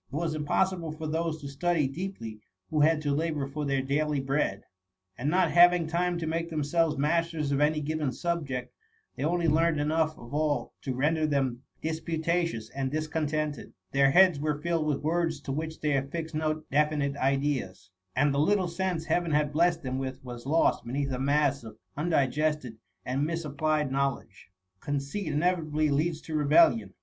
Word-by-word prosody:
It -, -, -6 dB
was 160 Hz, 0 st, -1 dB
impossible 165 Hz, +2 st, 0 dB
for 155 Hz, 0 st, -7 dB
those 160 Hz, +1 st, -1 dB
to 140 Hz, -, -6 dB
study 150 Hz, +1 st, 0 dB
deeply 135 Hz, -, -6 dB, 0.3 s
who 155 Hz, -, +1 dB
had 155 Hz, 0 st, +3 dB
to 145 Hz, -1 st, +1 dB
labour 155 Hz, -1 st, -1 dB
for 150 Hz, +2 st, -4 dB
their 135 Hz, -1 st, 0 dB
daily 145 Hz, +2 st, 0 dB
bread; 135 Hz, -7 st, -1 dB, 0.5 s
and 135 Hz, +8 st, -2 dB
not 185 Hz, +4 st, +2 dB
having 175 Hz, -1 st, +6 dB
time 175 Hz, +2 st, 0 dB
to 165 Hz, -, -3 dB
make 165 Hz, +1 st, -2 dB
themselves 155 Hz, 0 st, 0 dB
masters 160 Hz, 0 st, 0 dB
of 140 Hz, +1 st, +1 dB
any 150 Hz, +1 st, +2 dB
given 150 Hz, -2 st, -1 dB
subject, 135 Hz, -7 st, -3 dB, 0.4 s
they 130 Hz, -, -4 dB
only 170 Hz, +2 st, +1 dB
learned 160 Hz, 0 st, +3 dB
enough 155 Hz, +1 st, +1 dB
of 120 Hz, +2 st, -12 dB
all 150 Hz, -1 st, 0 dB
to 130 Hz, -2 st, -3 dB
render 155 Hz, +4 st, +1 dB
them 135 Hz, -4 st, 0 dB, 0.2 s
disputatious 160 Hz, -5 st, -1 dB
and 135 Hz, -1 st, -2 dB
discontented. 155 Hz, -1 st, -2 dB, 0.2 s
Their 135 Hz, 0 st, +4 dB
heads 180 Hz, 0 st, +5 dB
were 150 Hz, 0 st, -1 dB
filled 165 Hz, -1 st, 0 dB
with 145 Hz, -2 st, -1 dB
words 165 Hz, -1 st, 0 dB
to 140 Hz, -, -5 dB
which 160 Hz, +3 st, -4 dB
they 150 Hz, -2 st, +1 dB
affixed 160 Hz, +4 st, -3 dB
no 155 Hz, 0 st, -1 dB
definite 145 Hz, -1 st, +1 dB
ideas, 135 Hz, -9 st, -1 dB, 0.2 s
and 145 Hz, +2 st, +3 dB
the 140 Hz, -, +1 dB
little 185 Hz, +4 st, +2 dB
sense 170 Hz, -1 st, -2 dB
Heaven 170 Hz, +1 st, 0 dB
had 150 Hz, -1 st, +1 dB
blessed 170 Hz, +1 st, +2 dB
them 130 Hz, 0 st, -2 dB
with 130 Hz, 0 st, -5 dB
was 120 Hz, 0 st, -8 dB
lost 160 Hz, +3 st, +2 dB
beneath 135 Hz, +3 st, -2 dB
a 125 Hz, -, -2 dB
mass 140 Hz, -1 st, +1 dB
of 110 Hz, -1 st, -10 dB, 0.2 s
undigested 150 Hz, -4 st, 0 dB, 0.3 s
and 130 Hz, +3 st, -1 dB
misapplied 155 Hz, -2 st, -1 dB
knowledge. 135 Hz, -9 st, -2 dB, 0.3 s
Conceit 145 Hz, -, -3 dB
inevitably 155 Hz, -1 st, +1 dB
leads 155 Hz, +3 st, 0 dB
to 160 Hz, -, -8 dB
rebellion. 145 Hz, -, +4 dB
150 Hz, 170 wpm, -28 LUFS, 140-165 Hz, 0.5 s, having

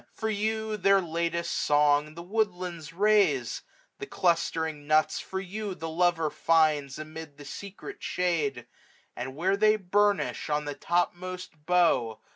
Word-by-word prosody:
For 220 Hz, -1 st, -2 dB
you 220 Hz, +1 st, -1 dB
their 195 Hz, 0 st, +4 dB
latest 170 Hz, -1 st, -2 dB
song 150 Hz, +1 st, +2 dB
The 170 Hz, -, -8 dB
woodlands 180 Hz, -6 st, -2 dB
raise; 195 Hz, -, +2 dB, 0.4 s
the -, -, -6 dB
clustering 160 Hz, -3 st, 0 dB
nuts 155 Hz, 0 st, +3 dB
for 190 Hz, -, -5 dB
you 195 Hz, +1 st, -5 dB
The 165 Hz, -1 st, -5 dB
lover 165 Hz, -2 st, +2 dB
finds 150 Hz, -3 st, +2 dB
amid 155 Hz, -1 st, -9 dB
the 145 Hz, -, -11 dB
secret 200 Hz, -, -8 dB
shade; 155 Hz, -9 st, -1 dB, 0.5 s
615 125 Hz, -, -4 dB
And, 130 Hz, -, -9 dB
where 185 Hz, +6 st, +1 dB
they 215 Hz, +1 st, +4 dB
burnish 205 Hz, -1 st, +1 dB
on 150 Hz, 0 st, 0 dB
the 145 Hz, -, -3 dB
topmost 175 Hz, -1 st, -3 dB
bough. 145 Hz, -11 st, +2 dB
170 Hz, 140 wpm, -28 LUFS, 150-195 Hz, 0.5 s, their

